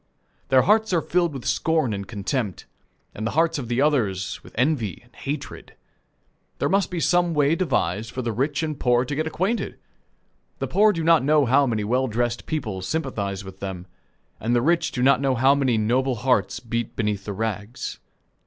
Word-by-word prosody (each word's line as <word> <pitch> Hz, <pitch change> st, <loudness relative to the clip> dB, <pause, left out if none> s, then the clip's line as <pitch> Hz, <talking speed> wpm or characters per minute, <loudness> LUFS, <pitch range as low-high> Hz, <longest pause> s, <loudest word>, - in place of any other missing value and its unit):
Their 130 Hz, -1 st, +5 dB
hearts 215 Hz, 0 st, +3 dB
are 170 Hz, -, +3 dB
filled 175 Hz, -1 st, +1 dB
with 135 Hz, -4 st, -8 dB
scorn 160 Hz, -8 st, +1 dB
and 100 Hz, -1 st, -5 dB
contempt, 105 Hz, -, -3 dB, 0.5 s
and 110 Hz, +2 st, -4 dB
the 125 Hz, -, -4 dB
hearts 165 Hz, -2 st, +2 dB
of 125 Hz, -, -5 dB
the 120 Hz, +3 st, +1 dB
others 105 Hz, -, 0 dB
with -, -, -15 dB
envy 125 Hz, -, 0 dB
and 120 Hz, 0 st, -26 dB
hatred. 140 Hz, +1 st, -6 dB, 0.8 s
There -, -, 0 dB
must 195 Hz, +1 st, +2 dB
be 180 Hz, -2 st, -3 dB
some 175 Hz, 0 st, +2 dB
way 145 Hz, +1 st, +3 dB
devised 115 Hz, -, 0 dB
for 130 Hz, +2 st, -5 dB
the 115 Hz, -, -1 dB
rich 140 Hz, +7 st, -1 dB
and 155 Hz, -3 st, -3 dB
poor 125 Hz, 0 st, +2 dB
to 145 Hz, -, -4 dB
get 155 Hz, +2 st, -1 dB
acquainted. 190 Hz, +8 st, -2 dB, 0.8 s
The -, -, -2 dB
poor 215 Hz, +1 st, +4 dB
do 165 Hz, -4 st, -3 dB
not 165 Hz, -4 st, +5 dB
know 150 Hz, 0 st, +4 dB
how 135 Hz, +3 st, +4 dB
many 110 Hz, -3 st, -1 dB
well 125 Hz, +5 st, +1 dB
dressed 120 Hz, +1 st, -2 dB
people 110 Hz, -, -3 dB
sympathize 100 Hz, -, -3 dB
with 95 Hz, 0 st, -11 dB
them, 95 Hz, -2 st, -5 dB, 0.5 s
and 120 Hz, +2 st, 0 dB
the 120 Hz, -, +2 dB
rich 170 Hz, +3 st, +2 dB
do 125 Hz, -, -2 dB
not 135 Hz, 0 st, +4 dB
know 135 Hz, -2 st, +2 dB
how 130 Hz, +3 st, +5 dB
many 135 Hz, -5 st, +1 dB
noble 125 Hz, +4 st, +1 dB
hearts 120 Hz, -5 st, +1 dB
beat 115 Hz, -1 st, -4 dB
beneath 105 Hz, -3 st, -2 dB
the 105 Hz, -, -4 dB
rags. 110 Hz, +2 st, -4 dB
130 Hz, 190 wpm, -24 LUFS, 110-155 Hz, 0.8 s, Their